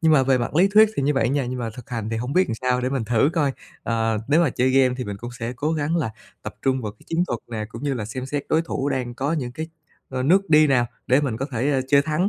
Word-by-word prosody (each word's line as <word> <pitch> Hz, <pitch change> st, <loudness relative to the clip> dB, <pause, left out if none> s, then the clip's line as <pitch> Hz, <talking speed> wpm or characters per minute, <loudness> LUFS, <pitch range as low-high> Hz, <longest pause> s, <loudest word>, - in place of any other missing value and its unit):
Nhưng 160 Hz, -2 st, +4 dB
mà 135 Hz, -3 st, +5 dB
về 130 Hz, -1 st, +3 dB
mặt 120 Hz, +4 st, -3 dB
lý 185 Hz, +5 st, +5 dB
thuyết 220 Hz, 0 st, +8 dB
thì -, -, 0 dB
như 145 Hz, +2 st, +2 dB
vậy 120 Hz, -3 st, +2 dB
nha, 140 Hz, 0 st, 0 dB
nhưng 125 Hz, +1 st, -4 dB
mà 115 Hz, -2 st, -3 dB
thực 125 Hz, -1 st, -11 dB
hành 115 Hz, -3 st, -3 dB
thì 115 Hz, -, -1 dB
hông 125 Hz, +4 st, -3 dB
biết 185 Hz, +4 st, +3 dB
làm 115 Hz, -, -1 dB
sao, 125 Hz, +1 st, 0 dB
để 125 Hz, -, 0 dB
mình 130 Hz, -4 st, -2 dB
thử 120 Hz, +6 st, +2 dB
coi. 145 Hz, -5 st, +1 dB, 0.3 s
Ờ, 115 Hz, -1 st, 0 dB
nếu 150 Hz, +4 st, +4 dB
mà 150 Hz, -, +2 dB
chơi 125 Hz, +2 st, +1 dB
game 130 Hz, -1 st, +4 dB
thì 125 Hz, -, -2 dB
mình 100 Hz, -1 st, -5 dB
cũng 120 Hz, +4 st, -7 dB
sẽ 115 Hz, +1 st, -3 dB
cố 150 Hz, +6 st, -1 dB
gắng 155 Hz, +2 st, 0 dB
là 150 Hz, -10 st, -1 dB, 0.3 s
tập -, -, -6 dB
trung 130 Hz, -1 st, +1 dB
vào 105 Hz, -2 st, -4 dB
cái 105 Hz, -, -24 dB
chiến 170 Hz, +2 st, 0 dB
thuật 120 Hz, -, -2 dB
nè 110 Hz, -2 st, -3 dB
cũng 115 Hz, +3 st, -9 dB
như 145 Hz, -2 st, 0 dB
là 110 Hz, -4 st, -3 dB
xem 130 Hz, +4 st, -5 dB
xét 145 Hz, +1 st, -2 dB
đối 160 Hz, +1 st, +2 dB
thủ 140 Hz, -4 st, -2 dB
đang 125 Hz, -3 st, -2 dB
có 140 Hz, +5 st, -1 dB
những 130 Hz, -7 st, -2 dB
cái, 160 Hz, +5 st, -5 dB, 0.4 s
ờ, 130 Hz, -1 st, -3 dB
nước 190 Hz, +6 st, +3 dB
đi 155 Hz, 0 st, +7 dB
nào 125 Hz, -4 st, +3 dB, 0.2 s
để 130 Hz, +3 st, +4 dB
mình 130 Hz, -7 st, -2 dB
có 135 Hz, -, -3 dB
thể, 125 Hz, +5 st, 0 dB
a, 135 Hz, -, +2 dB
chơi 140 Hz, 0 st, +5 dB
thắng. 155 Hz, +6 st, 0 dB
130 Hz, 315 wpm, -23 LUFS, 120-150 Hz, 0.4 s, thuyết